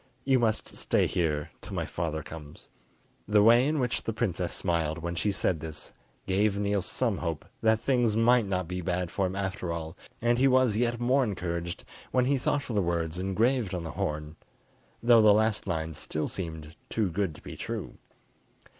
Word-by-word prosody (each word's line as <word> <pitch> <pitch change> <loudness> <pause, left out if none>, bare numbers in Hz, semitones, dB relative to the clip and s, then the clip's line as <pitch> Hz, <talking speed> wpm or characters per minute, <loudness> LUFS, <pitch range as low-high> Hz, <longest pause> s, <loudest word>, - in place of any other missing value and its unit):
"You 135 -1 +4
must 110 -2 +1
stay - - 0
here 75 -5 -1
till - - -8
my - - -1
father 80 -2 -3
comes." 75 -2 -10 0.6
The 105 -1 +5
way 120 +4 +6
in 155 +1 +1
which 125 -4 0
the 115 - -3
princess 90 -6 -1
smiled 80 -3 0
when 85 +1 -4
she 95 +5 0
said 95 -3 0
this 75 -1 -7 0.3
gave 100 +2 +2
Niels 100 -2 0
some 115 -7 0
hope 80 -3 -3 0.2
that 110 0 +4
things 120 -3 +2
might 115 -1 +4
not 90 -3 -1
be 90 +1 -3
bad 90 0 -2
for 95 -2 0
him 95 - -5
after 95 -3 -3
all, 80 0 -5 0.2
and 120 +1 +2
he 135 - +5
was 130 -4 +4
yet 120 +1 +1
more 130 +3 +3
encouraged 85 -5 -3 0.3
when 125 -1 +2
he 135 +1 +2
thought 140 +2 0
of 115 - -3
the 100 - +3
words 85 -1 -1
engraver 105 +1 +1
on 85 - -5
the 80 - -5
horn, 75 +1 -3 0.7
though 120 -1 +7
the 105 -1 +7
last 110 -1 +1
line 80 -2 -2
still 75 +1 -3
seemed 80 -3 -6
too 105 -5 0
good 90 -3 -1
to - - -13
be - - -8
true. - - -5
95 Hz, 190 wpm, -28 LUFS, 85-115 Hz, 0.7 s, though